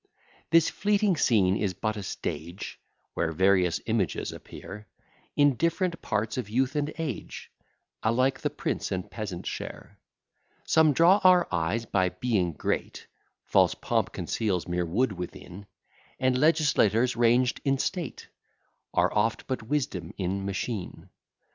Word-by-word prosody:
This 165 Hz, +1 st, +5 dB
fleeting 205 Hz, -1 st, +1 dB
scene 100 Hz, -, +3 dB
is 100 Hz, -4 st, -1 dB
but 110 Hz, +3 st, -2 dB
a 105 Hz, -, -5 dB
stage, 85 Hz, -1 st, -5 dB, 0.3 s
Where 80 Hz, -2 st, -1 dB
various 90 Hz, 0 st, +3 dB
images 110 Hz, -5 st, -1 dB
appear; 105 Hz, +1 st, -10 dB, 0.5 s
In 145 Hz, -1 st, +5 dB
different 170 Hz, +1 st, 0 dB
parts 110 Hz, +4 st, -1 dB
of 110 Hz, -5 st, -5 dB
youth 130 Hz, +5 st, 0 dB
and 150 Hz, 0 st, 0 dB
age, 155 Hz, -8 st, -5 dB, 0.5 s
Alike 130 Hz, +4 st, +2 dB
the -, -, -1 dB
prince -, -, -3 dB
and 90 Hz, -1 st, -3 dB
peasant 100 Hz, -6 st, -5 dB
share. -, -, -7 dB, 0.7 s
Some 160 Hz, -2 st, +4 dB
draw 175 Hz, +7 st, +5 dB
our 180 Hz, -1 st, +6 dB
eyes 90 Hz, +7 st, 0 dB
by 95 Hz, -4 st, +1 dB
being 90 Hz, -3 st, 0 dB
great, -, -, -3 dB, 0.4 s
False -, -, +3 dB
pomp -, -, -1 dB
conceals 95 Hz, -7 st, -2 dB
mere 90 Hz, 0 st, -1 dB
wood 115 Hz, +8 st, +1 dB
within; 90 Hz, +1 st, -8 dB, 0.5 s
And 130 Hz, -1 st, +2 dB
legislators 130 Hz, -6 st, +3 dB
ranged 120 Hz, +2 st, +3 dB
in 135 Hz, -1 st, +2 dB
state 170 Hz, 0 st, -3 dB, 0.7 s
Are -, -, +3 dB
oft 110 Hz, +2 st, +1 dB
but 130 Hz, -, -3 dB
wisdom 110 Hz, -, -2 dB
in 95 Hz, +1 st, -2 dB
machine. 100 Hz, 0 st, -4 dB
110 Hz, 135 wpm, -27 LUFS, 95-140 Hz, 0.7 s, our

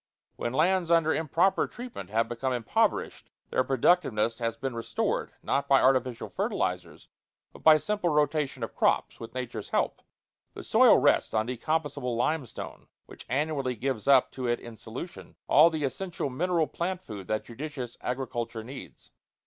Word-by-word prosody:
When 120 Hz, -, -3 dB
lands 170 Hz, +5 st, +2 dB
under 165 Hz, -2 st, +4 dB
improper 165 Hz, +5 st, +2 dB
treatment 235 Hz, -, -8 dB
have 115 Hz, +2 st, +1 dB
become 125 Hz, +3 st, -2 dB
impoverished, 120 Hz, -3 st, 0 dB, 0.2 s
their 130 Hz, -, +2 dB
productiveness 130 Hz, -4 st, +2 dB
has 115 Hz, -1 st, -2 dB
been 130 Hz, +1 st, -3 dB
restored, 115 Hz, 0 st, -2 dB
not 140 Hz, -, 0 dB
by 135 Hz, -1 st, +5 dB
artificial 130 Hz, -2 st, +2 dB
fertilizers, -, -, -3 dB, 0.5 s
but -, -, -14 dB
by 155 Hz, -1 st, +7 dB
simple 205 Hz, +2 st, -1 dB
rotation 150 Hz, -4 st, 0 dB
of 115 Hz, -, -4 dB
crops, -, -, +1 dB
with 115 Hz, -, -9 dB
nature's 120 Hz, -4 st, -5 dB
help. -, -, 0 dB, 0.5 s
The -, -, -7 dB
soil -, -, +6 dB
rests -, -, +2 dB
on 110 Hz, 0 st, +2 dB
decomposable 125 Hz, 0 st, -2 dB
limestone, 135 Hz, 0 st, -3 dB, 0.2 s
which -, -, -12 dB
annually 135 Hz, -1 st, -1 dB
gives 125 Hz, -1 st, -3 dB
up 135 Hz, -2 st, +5 dB
to 130 Hz, -2 st, -4 dB
it 120 Hz, 0 st, +1 dB
in 120 Hz, -1 st, -10 dB
solution 120 Hz, +11 st, -8 dB
all 155 Hz, +4 st, +7 dB
the 160 Hz, -3 st, -3 dB
essential 165 Hz, 0 st, -3 dB
mineral 170 Hz, +4 st, +1 dB
plant 180 Hz, +3 st, -3 dB
food 100 Hz, -4 st, -8 dB
that 110 Hz, 0 st, -1 dB
judicious 125 Hz, -1 st, -6 dB
agriculture 120 Hz, -3 st, -3 dB
needs. 130 Hz, +5 st, -11 dB
130 Hz, 155 wpm, -28 LUFS, 120-155 Hz, 0.5 s, by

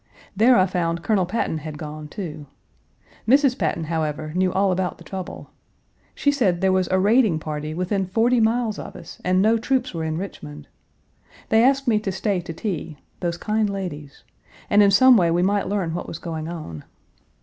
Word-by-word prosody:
There 240 Hz, +5 st, +5 dB
I 185 Hz, -, +5 dB
found 170 Hz, -2 st, -2 dB
Colonel 195 Hz, -5 st, +1 dB
Patton 185 Hz, -5 st, -2 dB
had 155 Hz, 0 st, -7 dB
gone, 150 Hz, 0 st, -7 dB
too. 155 Hz, -3 st, -7 dB, 0.8 s
Mrs. 270 Hz, +1 st, +4 dB
Patton, 165 Hz, -4 st, -1 dB
however, 155 Hz, -1 st, -3 dB
knew 185 Hz, +1 st, +1 dB
all 195 Hz, +1 st, +2 dB
about 180 Hz, 0 st, -1 dB
the -, -, -14 dB
trouble. 190 Hz, -2 st, -7 dB, 0.6 s
She 285 Hz, -, +2 dB
said 205 Hz, -12 st, +1 dB
there 190 Hz, 0 st, +2 dB
was 185 Hz, -1 st, +1 dB
a 185 Hz, -, +2 dB
raiding 210 Hz, -2 st, +3 dB
party 155 Hz, 0 st, -5 dB
within 185 Hz, +2 st, -1 dB
forty 235 Hz, +6 st, +2 dB
miles 225 Hz, -1 st, +1 dB
of -, -, -8 dB
us -, -, -11 dB
and 185 Hz, +1 st, +2 dB
no 225 Hz, +2 st, +3 dB
troops 255 Hz, 0 st, -1 dB
were 165 Hz, -1 st, -3 dB
in 160 Hz, 0 st, -2 dB
Richmond! 75 Hz, -, -8 dB, 0.8 s
They 220 Hz, +1 st, +4 dB
asked 275 Hz, +1 st, +3 dB
me 220 Hz, -3 st, +3 dB
to 210 Hz, -2 st, -3 dB
stay 190 Hz, 0 st, -1 dB
to 170 Hz, -, -7 dB
tea 165 Hz, -3 st, -5 dB, 0.2 s
those 170 Hz, -1 st, -2 dB
kind 215 Hz, +2 st, 0 dB
ladies 170 Hz, -8 st, -6 dB, 0.5 s
and 205 Hz, 0 st, +6 dB
in 200 Hz, -, +6 dB
some 250 Hz, +5 st, +7 dB
way 175 Hz, -4 st, +3 dB
we 175 Hz, +2 st, +2 dB
might 200 Hz, +1 st, +1 dB
learn 190 Hz, -5 st, -1 dB
what 175 Hz, -, -4 dB
was 160 Hz, -, -6 dB
going 160 Hz, -2 st, -5 dB
on. 155 Hz, -, -7 dB
185 Hz, 190 wpm, -23 LUFS, 160-215 Hz, 0.8 s, some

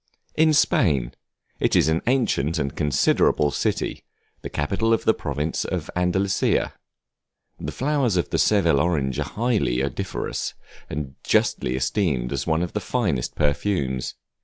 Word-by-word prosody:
In 160 Hz, 0 st, +4 dB
Spain; 85 Hz, -, +2 dB, 0.5 s
it -, -, +2 dB
is -, -, +4 dB
an 80 Hz, +1 st, +1 dB
ancient 105 Hz, -, +1 dB
and 70 Hz, -4 st, -2 dB
considerable 75 Hz, 0 st, +2 dB
city, -, -, -2 dB, 0.4 s
the -, -, -6 dB
capital 100 Hz, +10 st, 0 dB
of 115 Hz, -, 0 dB
the 110 Hz, -, +5 dB
province 75 Hz, -1 st, -2 dB
of -, -, -4 dB
Andalusia. 95 Hz, +2 st, +1 dB, 0.9 s
The -, -, -4 dB
flowers 135 Hz, -7 st, 0 dB
of 85 Hz, -, -1 dB
the -, -, +1 dB
Seville 70 Hz, -, +3 dB
orange 70 Hz, -6 st, 0 dB
are -, -, -1 dB
highly 105 Hz, -, 0 dB
odoriferous, 70 Hz, -2 st, -3 dB, 0.3 s
and 70 Hz, -2 st, -4 dB
justly 60 Hz, -, +1 dB
esteemed 65 Hz, -, 0 dB, 0.2 s
one 80 Hz, +1 st, +1 dB
of 90 Hz, -, -5 dB
the 105 Hz, -, -1 dB
finest 90 Hz, -, -1 dB
perfumes. 70 Hz, -4 st, -1 dB
80 Hz, 135 wpm, -23 LUFS, 70-105 Hz, 0.9 s, the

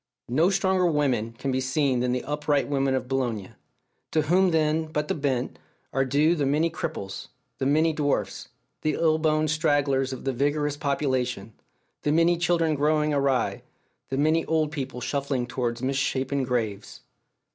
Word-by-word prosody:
No 155 Hz, +9 st, +3 dB
stronger 190 Hz, -2 st, +2 dB
women 130 Hz, -8 st, 0 dB
can 135 Hz, +4 st, -3 dB
be 130 Hz, 0 st, 0 dB
seen 130 Hz, 0 st, +1 dB
than 125 Hz, 0 st, 0 dB
the 125 Hz, 0 st, -1 dB
upright 145 Hz, -1 st, 0 dB
women 135 Hz, -1 st, +1 dB
of 130 Hz, -1 st, -2 dB
Boulogne; 120 Hz, -7 st, -2 dB, 0.6 s
to 155 Hz, -, +1 dB
whom 180 Hz, +5 st, +3 dB
then, 160 Hz, -1 st, +1 dB
but 150 Hz, -1 st, -2 dB
the -, -, 0 dB
bent, 135 Hz, -4 st, -2 dB, 0.3 s
are 135 Hz, -, +2 dB
due 145 Hz, +5 st, +3 dB
the 145 Hz, -5 st, 0 dB
many 155 Hz, +4 st, +2 dB
cripples, 150 Hz, -, -5 dB, 0.3 s
the 130 Hz, -, 0 dB
many 155 Hz, +3 st, +3 dB
dwarfs, 145 Hz, -2 st, -2 dB, 0.3 s
the 155 Hz, -1 st, 0 dB
ill 160 Hz, -1 st, +2 dB
boned 155 Hz, -1 st, +1 dB
stragglers 140 Hz, -3 st, +1 dB
of 130 Hz, -, -6 dB
that 135 Hz, -, 0 dB
vigorous 145 Hz, +3 st, 0 dB
population, 130 Hz, -7 st, -1 dB, 0.5 s
the 145 Hz, -, 0 dB
many 165 Hz, +2 st, +4 dB
children 170 Hz, -2 st, +1 dB
growing 150 Hz, +1 st, +1 dB
awry, 140 Hz, -2 st, +1 dB, 0.5 s
the 135 Hz, -, -2 dB
many 155 Hz, +3 st, +2 dB
old 155 Hz, -2 st, +1 dB
people 135 Hz, -4 st, -5 dB
shuffling 140 Hz, -1 st, -1 dB
towards 120 Hz, -1 st, -3 dB
misshapen 135 Hz, 0 st, 0 dB
graves? 115 Hz, -5 st, -3 dB
145 Hz, 160 wpm, -26 LUFS, 130-155 Hz, 0.6 s, many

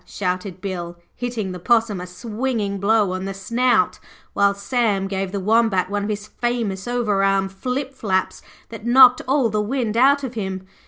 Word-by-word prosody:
shouted 185 Hz, -1 st, -4 dB
Bill, 175 Hz, -3 st, -5 dB, 0.2 s
hitting 235 Hz, -6 st, -3 dB
the 180 Hz, -, -7 dB
Possum 225 Hz, -1 st, +1 dB
a 180 Hz, -, -7 dB
swinging 210 Hz, +1 st, -3 dB
blow 205 Hz, -1 st, +2 dB
on 185 Hz, +1 st, -4 dB
the 195 Hz, 0 st, -5 dB
snout, 235 Hz, +6 st, +1 dB, 0.3 s
while 200 Hz, 0 st, +3 dB
Sam 200 Hz, -2 st, 0 dB
gave 195 Hz, -1 st, -3 dB
the 200 Hz, -, -3 dB
Wombat 200 Hz, -2 st, +2 dB
one 205 Hz, 0 st, -1 dB
of -, -, -4 dB
his 210 Hz, 0 st, -3 dB
famous 225 Hz, -5 st, -3 dB
over 225 Hz, -5 st, 0 dB
arm 195 Hz, -1 st, +2 dB
flip 255 Hz, +8 st, -4 dB
flaps 190 Hz, -7 st, -1 dB, 0.3 s
that 225 Hz, -2 st, -9 dB
knocked 250 Hz, +1 st, +7 dB
all 265 Hz, -3 st, +2 dB
the 210 Hz, 0 st, 0 dB
wind 230 Hz, 0 st, -2 dB
out 275 Hz, +4 st, +4 dB
of 260 Hz, -2 st, -4 dB
him. 190 Hz, -4 st, -4 dB
210 Hz, 175 wpm, -21 LUFS, 195-240 Hz, 0.3 s, knocked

